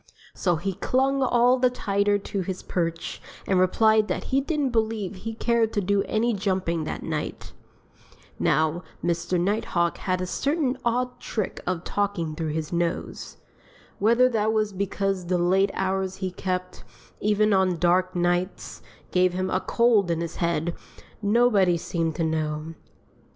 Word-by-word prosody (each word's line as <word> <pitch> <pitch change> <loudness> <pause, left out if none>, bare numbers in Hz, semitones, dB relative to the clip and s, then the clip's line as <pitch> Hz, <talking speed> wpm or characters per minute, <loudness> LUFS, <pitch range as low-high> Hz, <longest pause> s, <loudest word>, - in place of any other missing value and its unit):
So 175 -3 +1
he 190 +4 -2
clung 270 +7 +1
all 250 0 +4
the 255 0 +4
tighter 205 -4 +1
to 200 0 -4
his 185 0 -5
perch 165 -2 -3 0.2
and 190 -2 +2
replied 215 +3 +4
that - - -2
he 270 - +4
didn't 290 -2 -1
believe 220 -4 -1
he 220 +4 -6
cared 230 -1 +1
to 210 - +1
do 200 +1 +2
any 230 +2 +1
jumping 185 -5 -1
that - - -5
night. - - -4 0.9
Now, 160 +2 +2 0.2
Mr. 175 +1 0
Nighthawk 175 -2 0
had 185 -1 -1
a 185 - -2
certain 275 - 0
odd 245 +1 -1
trick 215 -4 -3
of 180 -1 -1
talking 195 -6 -1
through 155 -1 -3
his 160 +1 -3
nose. 170 -1 -3 0.6
Whether 235 +5 +5
that 220 -2 +1
was 215 -2 0
because 195 -1 -2
the 180 0 +1
late 190 +3 +3
hours 190 0 -1
he 190 -1 -3
kept, 185 0 -4 0.4
even 210 0 +2
on 190 -2 +2
dark 180 +2 +2
nights, 175 +1 -1 0.3
gave 180 0 +3
him 185 +1 -2
a 185 - +2
cold 230 -6 +3
in 165 -1 0
his 170 -1 -5
head, 170 -1 0 0.5
nobody 205 -4 +3
seemed 165 -1 -2
to 170 - -1
know. 155 0 -2
190 Hz, 155 wpm, -25 LUFS, 175-220 Hz, 0.9 s, Whether